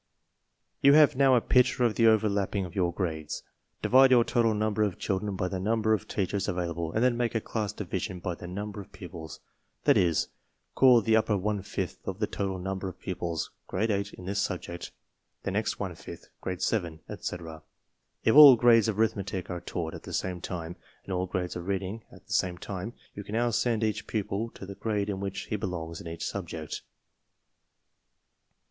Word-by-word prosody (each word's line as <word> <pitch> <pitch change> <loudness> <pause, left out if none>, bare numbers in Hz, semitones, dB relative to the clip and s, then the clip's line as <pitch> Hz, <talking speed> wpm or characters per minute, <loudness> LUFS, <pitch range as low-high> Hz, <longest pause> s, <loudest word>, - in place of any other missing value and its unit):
You 140 0 +7
have 150 -3 +6
now 135 -1 +5
a 120 - +4
picture 125 0 +3
of 115 -3 +3
the 115 0 +4
overlapping 100 -3 +2
of 90 - -9
your 90 -4 +1
grades. 80 -4 -3 0.4
Divide 130 +1 +6
your 125 -2 +6
total 115 -2 +2
number 110 0 0
of 100 -4 +1
children 100 0 -2
by 90 - -1
the 95 0 -3
number 110 +2 +2
of 105 - -1
teachers 100 0 -1
available 85 -2 -2
and 110 - +1
then 125 -1 +3
make 120 -1 -1
a - - +3
class 105 -1 -3
division 95 -2 -4
by 90 0 -3
the 90 - -9
number 100 +3 -5
of 95 - -14
pupils; 80 -3 -9 0.4
that - - +5
is, 85 -3 +2 0.4
call 125 -3 +6
the 110 +1 +3
upper 110 -2 +2
one 105 +1 -1
fifth - - -4
of 95 - -3
the 105 - +1
total 95 -2 -3
number 95 +1 -3
of 90 - -12
pupils 85 -3 -3 0.2
Grade 110 +4 0
8 100 0 -1
in 90 - -10
this 100 +2 -1
subject, 85 -3 -4 0.5
the - - -2
next - - -1
one - - -3
fifth, - - -11
Grade 90 -1 -3
7, 85 -8 -1
etc. 80 -2 -6 0.6
If 110 - +4
all 145 -3 +11
grades 115 -2 +5
of 110 -2 -1
arithmetic 100 -4 -1
are 90 -1 -4
taught 80 -2 -4
at - - -8
the - - -9
same 90 -2 -2
time 85 -2 -5 0.3
and 95 - -5
all 90 0 -1
grades 90 -1 -3
of 90 0 -6
reading 100 +3 -3
at - - -16
the - - -6
same 90 -1 +1
time, 95 +5 -5 0.2
you 100 - -7
can 105 - -9
no 120 +2 +2
wsendea 110 -1 +1
ch 110 - -8
pupil 105 +1 -2
to - - -8
the 100 - -7
grade 105 0 -2
in 95 - -4
which 100 -1 -3
he - - -4
belongs 85 -4 -4
in - - -9
each 85 0 -5
subject. 80 -5 -5
100 Hz, 200 wpm, -28 LUFS, 90-110 Hz, 0.6 s, all